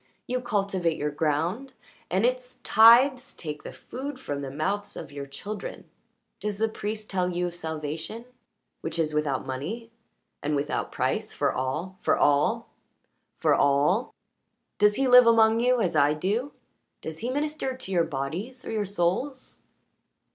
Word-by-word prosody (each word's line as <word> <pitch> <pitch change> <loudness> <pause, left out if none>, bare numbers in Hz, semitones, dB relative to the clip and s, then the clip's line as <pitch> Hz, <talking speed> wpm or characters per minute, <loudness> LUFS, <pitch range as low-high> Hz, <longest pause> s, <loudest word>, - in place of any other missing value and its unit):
You 250 0 -2
cultivate 195 -8 0
your 150 0 -1
ground, 165 - -1 0.4
and 190 +5 +2
its 255 0 -1
tithes 245 +4 +6
take 150 -2 -6
the - - -8
food 265 +1 -7
from 145 - -4
the 135 - -4
mouths 195 +9 -3
of - - -8
your 140 -1 -6
children. 200 +10 -7 0.5
Does 210 -1 -3
the 225 +2 +2
priest 215 0 -5
tell 180 -2 0
you 180 0 -1
of 175 - -4
salvation, 160 +6 -5 0.6
which 165 +1 -4
is 155 -2 0
without 150 -4 0
money 205 - -5 0.5
and 150 +1 0
without 145 +1 -2
price, - - -1
for - - 0
all 155 +9 -3
for - - +2
all 145 0 +2 0.7
for - - +3
all? 145 - +3 0.7
Does 210 0 +5
he 270 +3 +1
live 250 -1 +8
among 225 -1 +5
you 250 +1 +3
as 175 -5 0
I 145 0 +4
do? 215 - -1 0.5
Does 160 0 -6
he 235 - -3
minister 290 -1 -2
to 225 -7 -7
your 175 -3 +3
bodies? 175 - -4
Or - - -5
your 215 -2 -1
souls?" 200 +9 -2
195 Hz, 155 wpm, -27 LUFS, 150-235 Hz, 0.7 s, live